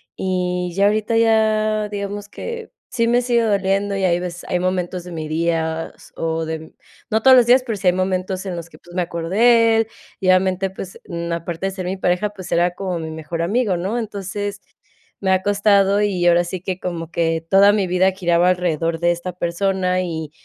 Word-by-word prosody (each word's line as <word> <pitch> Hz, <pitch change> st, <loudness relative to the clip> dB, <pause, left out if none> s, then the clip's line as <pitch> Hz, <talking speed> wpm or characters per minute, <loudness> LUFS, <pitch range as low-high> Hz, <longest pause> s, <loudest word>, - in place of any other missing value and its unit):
Y 180 Hz, -1 st, -1 dB
ya 200 Hz, +1 st, +3 dB
ahorita 215 Hz, +2 st, +1 dB
ya, 215 Hz, -1 st, +2 dB
digamos 205 Hz, 0 st, -5 dB
que 465 Hz, -, -7 dB, 0.2 s
sí 230 Hz, -2 st, 0 dB
me 240 Hz, +1 st, +3 dB
sigue 240 Hz, -1 st, +2 dB
doliendo 200 Hz, -2 st, +1 dB
y 190 Hz, -, 0 dB
hay 175 Hz, -1 st, +2 dB
veces 175 Hz, -1 st, -6 dB
hay 180 Hz, -, 0 dB
momentos 180 Hz, -1 st, -2 dB
de 180 Hz, -, -10 dB
mis 160 Hz, -2 st, -5 dB
días, 160 Hz, 0 st, -2 dB
o 165 Hz, 0 st, -2 dB
de 160 Hz, 0 st, -3 dB
mm 160 Hz, -, -12 dB, 0.4 s
no 220 Hz, 0 st, +1 dB
todos 265 Hz, -1 st, +8 dB
los 245 Hz, -2 st, +6 dB
días, 255 Hz, +1 st, +5 dB
pero 230 Hz, -3 st, -2 dB
sí 195 Hz, -2 st, -2 dB
hay 180 Hz, -, +5 dB
momentos 185 Hz, +1 st, -2 dB
en 185 Hz, -2 st, -4 dB
los 170 Hz, -1 st, -7 dB
que, -, -, -16 dB
pues, 175 Hz, 0 st, -16 dB
me 185 Hz, -, +1 dB
acuerdo 170 Hz, -1 st, -4 dB
de 230 Hz, +2 st, +5 dB
él, 225 Hz, -1 st, +1 dB, 0.3 s
y 190 Hz, -, -2 dB
obviamente, 185 Hz, +1 st, +3 dB
pues, 190 Hz, 0 st, -9 dB
mm, 170 Hz, -1 st, -4 dB
aparte 170 Hz, +1 st, -4 dB
de -, -, -3 dB
ser 190 Hz, -1 st, -6 dB
mi 185 Hz, +2 st, -3 dB
pareja, 180 Hz, +3 st, 0 dB
pues 190 Hz, -3 st, -10 dB
era 175 Hz, +1 st, +2 dB
como 185 Hz, -3 st, -3 dB
mi 160 Hz, -1 st, -5 dB
mejor 160 Hz, +1 st, -5 dB
amigo, 200 Hz, +2 st, +1 dB
¿no? 195 Hz, +7 st, -2 dB
Entonces 205 Hz, -2 st, -4 dB, 0.6 s
me 190 Hz, -1 st, +1 dB
ha 185 Hz, 0 st, +3 dB
costado 200 Hz, 0 st, +3 dB
y 190 Hz, -4 st, 0 dB
ahora 175 Hz, 0 st, +5 dB
sí 175 Hz, +1 st, -5 dB
que 185 Hz, 0 st, -4 dB
como 170 Hz, -3 st, -4 dB
que 165 Hz, -1 st, 0 dB
toda 200 Hz, +1 st, +6 dB
mi 200 Hz, -3 st, +1 dB
vida 185 Hz, +2 st, +3 dB
giraba 175 Hz, -2 st, +2 dB
alrededor 165 Hz, -2 st, 0 dB
de 175 Hz, +1 st, +3 dB
esta 175 Hz, +1 st, -4 dB
persona 185 Hz, +1 st, 0 dB
y, 160 Hz, -4 st, -4 dB
185 Hz, 210 wpm, -20 LUFS, 175-205 Hz, 0.6 s, todos